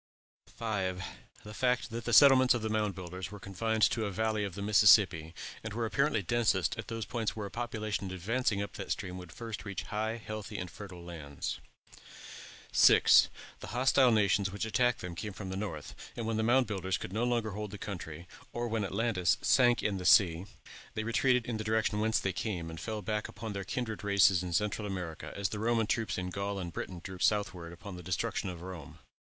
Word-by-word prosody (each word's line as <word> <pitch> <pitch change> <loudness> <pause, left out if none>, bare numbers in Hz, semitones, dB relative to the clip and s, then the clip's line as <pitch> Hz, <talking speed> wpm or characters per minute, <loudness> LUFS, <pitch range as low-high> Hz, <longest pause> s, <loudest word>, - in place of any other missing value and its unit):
5. 95 -5 -3 0.4
The 105 - -9
fact 125 +1 0
that 115 +1 -5
the 120 - -1
settlements 130 +1 +7
of 115 - -3
the 110 - -1
Mound 105 -2 0
Builders 90 +1 -6
were 105 0 -9
confined 110 +4 -1
to 115 - +4
the 105 - -1
valley 110 +1 0
of 100 -4 -4
the 100 - -5
Mississippi, 100 -6 +5 0.3
and 110 -1 -5
were 115 0 -1
apparently 140 -1 +1
densest 100 -6 +1
at - - -5
those 115 -1 -4
points 115 -3 -2
where 105 -2 -4
a 100 - -7
population 110 -4 -3
advancing 100 +3 -1
up 100 - -7
that, 100 - -6
stream 90 -3 -3
would 90 -2 -10
first 115 -3 -6
reach 100 -2 -5
high, 110 +2 -2
healthy, 110 -2 -6
and 90 -2 -5
fertile 95 -4 -10
lands. 75 -5 -5 1.1
6. - - +7 0.3
The - - -8
hostile 130 0 +5
nations 100 -2 +2
which 105 +2 -3
attacked 120 +3 +1
them 90 -1 -5
came 105 +4 -5
from 95 0 -7
the - - -3
north; 90 -7 -5 0.2
and 115 - -3
when 110 0 -1
the - - +1
Mound 125 +3 +4
Builders 95 -3 -2
could 95 - -7
no 110 +3 0
longer 120 -3 0
hold 105 +1 -5
the 100 - -8
country, 85 -4 -7 0.3
or 120 0 -2
when 110 -2 -1
Atlantis 100 -3 +1
sank 120 -2 +4
in 100 -2 0
the 90 - -5
sea, 90 -1 +5 0.5
they 110 - -1
retreated 120 +2 +2
in 120 -2 -3
the 110 - -4
direction 110 -1 +1
whence 110 +1 +2
they 95 - -1
came, 90 -5 -3
and 80 - -8
fell 110 +3 -4
back 105 +3 -2
upon 110 -1 -7
their 100 -1 -4
kindred 110 +2 -4
races 100 -3 +4
in 90 -1 -4
Central 105 +3 0
America, 90 -5 -5
as 100 -2 -1
the 105 - -5
Roman 115 0 +2
troops 110 +1 -1
in 90 0 -3
Gaul 100 +1 -3
and 85 -3 -5
Britain 90 -2 -5
drew 95 -2 -7
southward 95 -6 0
upon 90 +2 -9
the - - -8
destruction 95 +2 -2
of 90 -1 -7
Rome. 85 -4 -9
105 Hz, 210 wpm, -31 LUFS, 95-115 Hz, 1.1 s, settlements